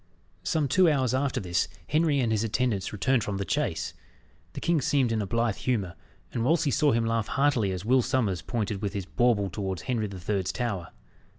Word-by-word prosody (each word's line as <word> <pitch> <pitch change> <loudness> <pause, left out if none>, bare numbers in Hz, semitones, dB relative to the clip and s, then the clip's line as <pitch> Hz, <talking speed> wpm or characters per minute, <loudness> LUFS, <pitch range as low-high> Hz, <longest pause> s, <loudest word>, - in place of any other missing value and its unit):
Some 155 -4 0
two 180 +6 +4
hours 130 -5 +1
after 135 0 0
this, 90 -2 0 0.2
Henry 155 -2 +2
and 115 -3 +1
his 110 0 +1
attendants 115 -3 0
returned 115 +3 +1
from 100 -1 -3
the 100 - -2
chase. - - -1 0.6
The - - -5
king 170 -3 +1
seemed 130 -2 +2
in 110 -1 0
a 100 - -3
blithe 115 +1 0
humour, 105 -9 -1 0.4
and 115 - -1
Wolsey 150 +2 +2
saw 150 +1 +3
him 115 -1 +1
laugh 115 -1 0
heartily 135 -8 +2
as 95 +1 -5
Will 130 +3 +4
Sommers 110 -8 0
pointed 105 -4 -3
with 100 -2 -2
his 100 -3 -3
bauble 105 -3 +1
towards 95 -3 -4
Henry 115 -4 -1
the 95 -2 -8
Third's 95 +1 -1
Tower. 105 -9 -3
115 Hz, 200 wpm, -27 LUFS, 100-130 Hz, 0.6 s, two